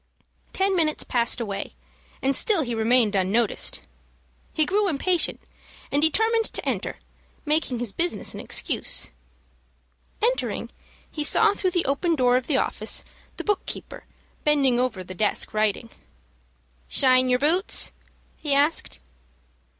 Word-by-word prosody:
Ten 385 Hz, 0 st, 0 dB
minutes 315 Hz, -3 st, +1 dB
passed 240 Hz, 0 st, 0 dB
away, 200 Hz, -4 st, -5 dB, 0.5 s
and 270 Hz, +1 st, +2 dB
still 395 Hz, -1 st, +2 dB
he 240 Hz, -2 st, -4 dB
remained 225 Hz, -1 st, +2 dB
unnoticed. 200 Hz, +4 st, +1 dB, 0.7 s
He 310 Hz, -, +1 dB
grew 405 Hz, +5 st, +1 dB
impatient, 350 Hz, +2 st, +1 dB, 0.5 s
and 285 Hz, -, +1 dB
determined 445 Hz, +8 st, +2 dB
to -, -, -3 dB
enter, -, -, -2 dB, 0.5 s
making 300 Hz, -4 st, 0 dB
his 235 Hz, -4 st, -4 dB
business 350 Hz, +1 st, -1 dB
an -, -, -8 dB
excuse. -, -, -1 dB, 1.1 s
Entering, -, -, -1 dB, 0.4 s
he 300 Hz, -, -3 dB
saw 425 Hz, +7 st, +4 dB
through 380 Hz, -2 st, -1 dB
the 350 Hz, -1 st, -1 dB
open 325 Hz, +5 st, 0 dB
door 250 Hz, -3 st, +3 dB
of 255 Hz, 0 st, -1 dB
the 285 Hz, -, +1 dB
office, -, -, -1 dB, 0.3 s
the -, -, -5 dB
book 415 Hz, -2 st, 0 dB
keeper, -, -, -7 dB, 0.4 s
bending 275 Hz, -5 st, +3 dB
over 235 Hz, -7 st, -1 dB
the 185 Hz, -, -9 dB
desk 210 Hz, +3 st, 0 dB
writing. 215 Hz, +1 st, -1 dB, 1.0 s
"Shine 255 Hz, -1 st, +4 dB
yer 250 Hz, -, +3 dB
boots?" 325 Hz, +9 st, +3 dB, 0.5 s
he 290 Hz, -3 st, 0 dB
asked. 290 Hz, +4 st, +1 dB
280 Hz, 135 wpm, -24 LUFS, 240-345 Hz, 1.1 s, saw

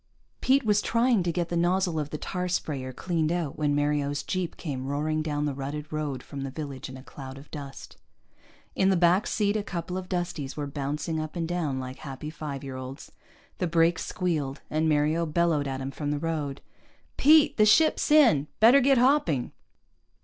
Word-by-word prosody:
Pete 270 Hz, +2 st, +3 dB
was 210 Hz, -1 st, +3 dB
trying 235 Hz, -2 st, +2 dB
to 175 Hz, -1 st, 0 dB
get 170 Hz, 0 st, -2 dB
the 175 Hz, -, -2 dB
nozzle 175 Hz, -1 st, +1 dB
of 150 Hz, -1 st, -3 dB
the 150 Hz, -, -4 dB
tar 180 Hz, +3 st, -3 dB
sprayer 140 Hz, -7 st, -2 dB
cleaned 160 Hz, +2 st, -1 dB
out 170 Hz, -5 st, -2 dB
when 150 Hz, -2 st, 0 dB
Mario's 145 Hz, -1 st, 0 dB
jeep 185 Hz, -3 st, -3 dB
came 135 Hz, -5 st, -4 dB
roaring 155 Hz, +2 st, -1 dB
down 150 Hz, -1 st, -1 dB
the 145 Hz, -, -1 dB
rutted 145 Hz, +3 st, -6 dB
road 150 Hz, -4 st, -3 dB
from 140 Hz, -2 st, -7 dB
the 135 Hz, -, -3 dB
village 135 Hz, -2 st, -6 dB
in 130 Hz, -, -8 dB
a 130 Hz, -, -12 dB
cloud 135 Hz, -1 st, -9 dB
of 140 Hz, +2 st, -14 dB
dust. 140 Hz, -3 st, -9 dB, 0.8 s
In 190 Hz, -, +3 dB
the 190 Hz, -, +3 dB
back 175 Hz, +4 st, +3 dB
seat 205 Hz, -1 st, +1 dB
a 215 Hz, -, +1 dB
couple 180 Hz, -2 st, -4 dB
of 185 Hz, 0 st, -10 dB
Dusties 170 Hz, -7 st, -3 dB
were 145 Hz, -, -2 dB
bouncing 145 Hz, +3 st, -3 dB
up 155 Hz, +2 st, -5 dB
and 165 Hz, -2 st, -2 dB
down 160 Hz, -6 st, -1 dB
like 130 Hz, 0 st, -6 dB
happy 140 Hz, +1 st, -7 dB
five 145 Hz, -4 st, -6 dB
year 135 Hz, -1 st, -6 dB
olds. 130 Hz, +2 st, -8 dB, 0.5 s
The 180 Hz, -, 0 dB
brakes 165 Hz, 0 st, +2 dB
squealed 155 Hz, -6 st, -2 dB
and 155 Hz, +1 st, +1 dB
Mario 155 Hz, +3 st, +2 dB
bellowed 155 Hz, -2 st, +1 dB
at 135 Hz, 0 st, -4 dB
him 135 Hz, +1 st, -4 dB
from 145 Hz, +2 st, -4 dB
the 145 Hz, -, 0 dB
road. 150 Hz, -3 st, -3 dB, 0.5 s
"Pete! 305 Hz, +1 st, +5 dB
The 215 Hz, -, +6 dB
ship's 315 Hz, +8 st, +4 dB
in! 245 Hz, -, +5 dB
Better 235 Hz, +5 st, +7 dB
get 270 Hz, +1 st, +4 dB
hopping!" 240 Hz, -, +2 dB
155 Hz, 195 wpm, -27 LUFS, 140-180 Hz, 0.8 s, Better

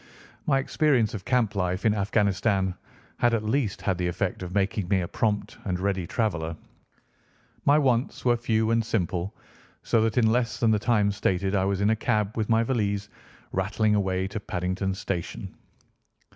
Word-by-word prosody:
My 135 Hz, -, +4 dB
experience 135 Hz, -5 st, +2 dB
of 100 Hz, -4 st, -6 dB
camp 125 Hz, -5 st, +2 dB
life 90 Hz, -1 st, -1 dB
in 110 Hz, -, +4 dB
Afghanistan 100 Hz, -2 st, +1 dB, 0.4 s
had 120 Hz, -1 st, +3 dB
at 110 Hz, -, -2 dB
least 110 Hz, -1 st, -1 dB
had 95 Hz, -3 st, 0 dB
the 90 Hz, -, 0 dB
effect 90 Hz, +2 st, -2 dB
of 90 Hz, -1 st, -5 dB
making 100 Hz, 0 st, 0 dB
me 95 Hz, 0 st, +2 dB
a 85 Hz, -, -3 dB
prompt 105 Hz, +1 st, -1 dB
and 90 Hz, -3 st, -2 dB
ready 95 Hz, -2 st, -1 dB
traveller. 85 Hz, -8 st, -1 dB, 1.1 s
My 145 Hz, +1 st, +6 dB
wants 130 Hz, -5 st, +1 dB
were 120 Hz, -1 st, +4 dB
few 110 Hz, -2 st, +1 dB
and 115 Hz, 0 st, +2 dB
simple, 95 Hz, -4 st, -2 dB, 0.5 s
so 115 Hz, -, +2 dB
that 110 Hz, +1 st, 0 dB
in 120 Hz, -, +5 dB
less 120 Hz, -2 st, 0 dB
than 115 Hz, -2 st, +3 dB
the 105 Hz, -, +3 dB
time 105 Hz, -2 st, +2 dB
stated 95 Hz, -1 st, 0 dB
I 95 Hz, -2 st, +2 dB
was 100 Hz, 0 st, 0 dB
in 105 Hz, +2 st, +3 dB
a -, -, +3 dB
cab 110 Hz, -2 st, 0 dB
with 110 Hz, -1 st, -2 dB
my 115 Hz, 0 st, +4 dB
valise, 105 Hz, -5 st, -1 dB, 0.4 s
rattling 105 Hz, +3 st, +1 dB
away 95 Hz, -2 st, 0 dB
to 100 Hz, -, -4 dB
Paddington 95 Hz, 0 st, -2 dB
Station. 95 Hz, -4 st, -4 dB
105 Hz, 175 wpm, -26 LUFS, 95-115 Hz, 1.1 s, My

